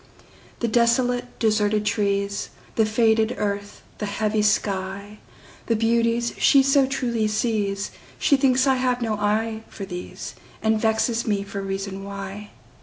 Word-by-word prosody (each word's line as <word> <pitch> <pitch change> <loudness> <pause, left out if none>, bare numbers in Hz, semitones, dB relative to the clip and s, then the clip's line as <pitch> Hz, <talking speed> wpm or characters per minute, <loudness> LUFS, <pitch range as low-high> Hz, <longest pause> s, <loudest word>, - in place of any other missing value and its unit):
The 235 - +1
desolate, 245 +2 +2
deserted 210 -1 +1
trees, 200 -1 0 0.3
The 220 -1 +3
faded 220 +1 +2
earth, 200 0 -3 0.2
the 210 - -2
heavy 215 +1 0
sky, 200 0 -1 0.5
The 230 - +2
beauties 230 +1 +1
she 275 -2 +6
so 275 0 +4
truly 240 -5 0
sees, 210 -2 -1 0.3
She 280 - +3
thinks 260 -1 +3
I 265 -1 +3
have 250 -1 0
no 225 -2 0
eye 220 +2 0
for 200 - -7
these, 180 -2 -7 0.3
And 220 0 +2
vexes 225 +1 +1
me 200 -2 +1
for 200 0 -6
reason 195 0 -4
why. 200 +1 -7
215 Hz, 140 wpm, -23 LUFS, 200-235 Hz, 0.5 s, she